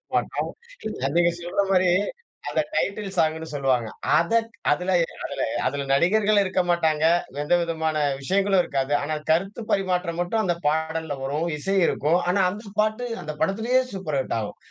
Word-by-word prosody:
மாட்டோம், -, -, -1 dB, 0.6 s
அது 135 Hz, -, -1 dB
நீங்க 175 Hz, 0 st, +4 dB
சொல்ற 175 Hz, +3 st, -1 dB
மாரி, 185 Hz, -1 st, +4 dB, 0.6 s
அந்த -, -, +1 dB
டைட்டில் 200 Hz, -1 st, -1 dB
சாங்குன்னு 160 Hz, 0 st, +1 dB
சொல்லுவாங்க. 130 Hz, -5 st, +1 dB, 0.3 s
அதக் 230 Hz, +7 st, +1 dB, 0.2 s
அதுல 180 Hz, +5 st, 0 dB, 0.3 s
அதுல -, -, -4 dB, 0.3 s
அதுல 140 Hz, 0 st, -2 dB
நடிகர்களும் 205 Hz, +6 st, +3 dB
இருக்க 185 Hz, -1 st, +1 dB
மாட்டாங்க. 160 Hz, -3 st, +2 dB, 0.4 s
எந்த 175 Hz, -, +3 dB
விதமான 160 Hz, -2 st, -1 dB, 0.2 s
விஷயங்களும் 195 Hz, +4 st, +2 dB
இருக்காது. 135 Hz, +1 st, -1 dB
ஆனா, 155 Hz, +2 st, -2 dB, 0.2 s
கருத்து 195 Hz, +7 st, 0 dB
பரிமாற்றம் 180 Hz, -3 st, 0 dB
மட்டும் 220 Hz, +5 st, 0 dB
அந்த 175 Hz, -3 st, +1 dB
பாடல்ல 160 Hz, -1 st, -1 dB
வரும், 150 Hz, +5 st, -1 dB
இசை 195 Hz, +7 st, -1 dB
இருக்கும். 160 Hz, +5 st, +2 dB
ஆனா 195 Hz, +2 st, +3 dB
அந்த 210 Hz, +3 st, -8 dB
பாட்டு, 215 Hz, +3 st, +1 dB, 0.2 s
அந்த 155 Hz, -, -5 dB
படத்துலயே 230 Hz, +6 st, +2 dB
சூப்பர் 155 Hz, -7 st, -2 dB
ஹிட்டாகும், 115 Hz, -5 st, -3 dB
175 Hz, 145 wpm, -24 LUFS, 155-195 Hz, 0.6 s, நீங்க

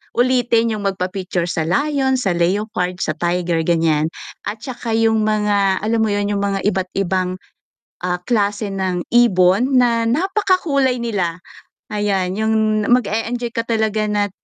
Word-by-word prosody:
ulitin 240 Hz, -2 st, +2 dB
yung 210 Hz, -2 st, -4 dB
magpa-picture 185 Hz, -2 st, -2 dB
sa 160 Hz, -, -1 dB
lion, 270 Hz, -, +1 dB
sa 200 Hz, -7 st, 0 dB
leopard, 180 Hz, 0 st, -1 dB
sa -, -, 0 dB
tiger 175 Hz, -1 st, 0 dB
ganyan, 160 Hz, -2 st, +2 dB, 0.4 s
at 210 Hz, +1 st, -5 dB
tsaka 240 Hz, -3 st, -4 dB
yung 225 Hz, -1 st, +2 dB
mga, 205 Hz, -3 st, +1 dB
alam 225 Hz, +1 st, +1 dB
mo -, -, +1 dB
yun, 205 Hz, 0 st, 0 dB
yung 200 Hz, -1 st, -1 dB
mga 195 Hz, -1 st, -1 dB
iba't 190 Hz, -2 st, 0 dB
ibang, 185 Hz, -1 st, 0 dB, 0.7 s
ah, 180 Hz, 0 st, 0 dB
klase 210 Hz, -2 st, 0 dB
ng 185 Hz, -2 st, -2 dB
ibon 235 Hz, +2 st, +4 dB
na 235 Hz, -2 st, +3 dB
napakakulay 315 Hz, -, +1 dB
nila, 190 Hz, -8 st, -2 dB, 0.5 s
ayan 195 Hz, -3 st, -1 dB
yung 220 Hz, -1 st, +1 dB
mag-e-enjoy 235 Hz, +1 st, 0 dB
ka 230 Hz, -2 st, -1 dB
talaga 220 Hz, -2 st, 0 dB
na 205 Hz, -1 st, 0 dB
210 Hz, 140 wpm, -19 LUFS, 185-230 Hz, 0.7 s, ibon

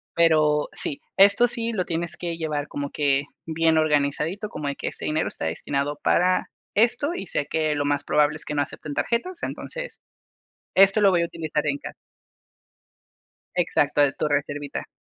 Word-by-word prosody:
Pero 155 Hz, -3 st, +3 dB
sí, 140 Hz, -, -2 dB, 0.2 s
esto 200 Hz, +5 st, +6 dB
sí 235 Hz, -1 st, -2 dB
lo 185 Hz, -4 st, -1 dB
tienes 170 Hz, 0 st, -3 dB
que 170 Hz, -2 st, -4 dB
llevar 150 Hz, -3 st, -2 dB
como 145 Hz, 0 st, -4 dB
que, 140 Hz, -1 st, +2 dB, 0.2 s
bien 160 Hz, 0 st, +2 dB
organizadito, 155 Hz, +6 st, +1 dB
como 150 Hz, -6 st, -5 dB
de 140 Hz, -, -2 dB
que, -, -, -5 dB
ese -, -, -5 dB
dinero 155 Hz, +1 st, 0 dB
está -, -, -5 dB
destinado 140 Hz, -, -2 dB
para 185 Hz, +1 st, +2 dB, 0.2 s
esto, 245 Hz, +7 st, +2 dB
y 195 Hz, -, -5 dB
sé 145 Hz, -, -2 dB
que 155 Hz, -1 st, 0 dB
lo 145 Hz, -, 0 dB
más 145 Hz, 0 st, 0 dB
probable 150 Hz, +1 st, +2 dB
es -, -, -11 dB
que 150 Hz, -, -4 dB
no 145 Hz, -, +2 dB
acepten 145 Hz, +1 st, -5 dB
tarjetas. 325 Hz, -, -2 dB
Entonces, -, -, -5 dB, 0.8 s
esto 195 Hz, +2 st, +6 dB
lo 200 Hz, -1 st, +6 dB
voy 175 Hz, -2 st, +3 dB
a -, -, +1 dB
utilizar 160 Hz, -2 st, -3 dB
en 145 Hz, -1 st, 0 dB
ca -, -, -8 dB, 1.6 s
Exacto, 145 Hz, -4 st, +2 dB
de 145 Hz, -1 st, +5 dB
tu -, -, -1 dB
reservita. 145 Hz, 0 st, -2 dB
155 Hz, 175 wpm, -24 LUFS, 145-185 Hz, 1.6 s, esto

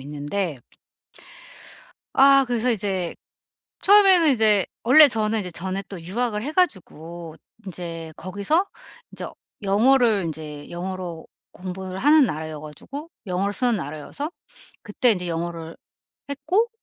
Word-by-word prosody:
있는데 145 Hz, +4 st, -4 dB, 1.6 s
아 275 Hz, 0 st, +6 dB
그래서 245 Hz, 0 st, 0 dB
이제 190 Hz, -5 st, -2 dB, 0.7 s
처음에는 380 Hz, -6 st, +6 dB
이제 215 Hz, -4 st, +3 dB, 0.2 s
원래 295 Hz, +5 st, +8 dB
저는 220 Hz, -2 st, 0 dB
이제 180 Hz, -, -5 dB
전에 190 Hz, +3 st, -4 dB
또 190 Hz, -3 st, -8 dB
유학을 210 Hz, +4 st, -2 dB
해 295 Hz, -, -4 dB
가지고 170 Hz, -, -2 dB, 0.3 s
인제 165 Hz, -3 st, -6 dB
거기서 200 Hz, -, 0 dB, 0.5 s
인제 -, -, -6 dB, 0.4 s
영어를 225 Hz, +1 st, +3 dB
인제 150 Hz, -2 st, -7 dB
영어로 175 Hz, -1 st, -6 dB, 0.3 s
공부를 185 Hz, 0 st, -7 dB
하는 295 Hz, +3 st, +5 dB
나라여 155 Hz, -1 st, -5 dB
가지고 275 Hz, -, -9 dB, 0.2 s
영어를 190 Hz, +2 st, -1 dB
쓰는 240 Hz, +2 st, +1 dB
나라여서 155 Hz, -, -5 dB, 0.5 s
그때 230 Hz, +2 st, +2 dB
이제 180 Hz, -3 st, -3 dB
영어를 165 Hz, -1 st, -5 dB, 0.5 s
했고 330 Hz, -, 0 dB
195 Hz, 265 characters per minute, -23 LUFS, 170-250 Hz, 1.6 s, 원래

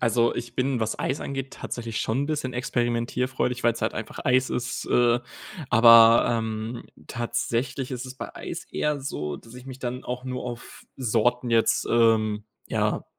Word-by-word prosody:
Also, 115 Hz, 0 st, +2 dB
ich 120 Hz, 0 st, -6 dB
bin, 130 Hz, -1 st, 0 dB
was 110 Hz, 0 st, -1 dB
Eis 135 Hz, -, -1 dB
angeht, 135 Hz, -1 st, -5 dB
tatsächlich 115 Hz, -2 st, -5 dB
schon 115 Hz, +4 st, 0 dB
'n -, -, -5 dB
bisschen 150 Hz, -4 st, -2 dB
experimentierfreudig, 125 Hz, 0 st, -1 dB
weil's 115 Hz, -1 st, +1 dB
halt -, -, 0 dB
einfach 110 Hz, -, -6 dB
Eis 130 Hz, 0 st, +3 dB
ist, 125 Hz, 0 st, -3 dB
äh. 120 Hz, 0 st, +3 dB, 0.5 s
Aber, 115 Hz, 0 st, +8 dB
ähm, 110 Hz, 0 st, -2 dB, 0.2 s
tatsächlich 120 Hz, +2 st, -2 dB
ist 125 Hz, 0 st, -4 dB
es 130 Hz, -, -8 dB
bei -, -, -7 dB
Eis -, -, -6 dB
eher 150 Hz, -1 st, 0 dB
so, 75 Hz, -, -4 dB
dass 115 Hz, +8 st, -15 dB
ich 125 Hz, 0 st, -11 dB
mich 130 Hz, -1 st, -8 dB
dann 125 Hz, +1 st, -4 dB
auch 125 Hz, +1 st, -5 dB
nur 130 Hz, -1 st, -4 dB
auf 120 Hz, -1 st, -8 dB
Sorten 120 Hz, 0 st, +1 dB
jetzt, 115 Hz, -1 st, +3 dB
ähm, 110 Hz, -2 st, +3 dB, 0.2 s
ja, -, -, 0 dB
120 Hz, 170 wpm, -25 LUFS, 115-125 Hz, 0.5 s, Aber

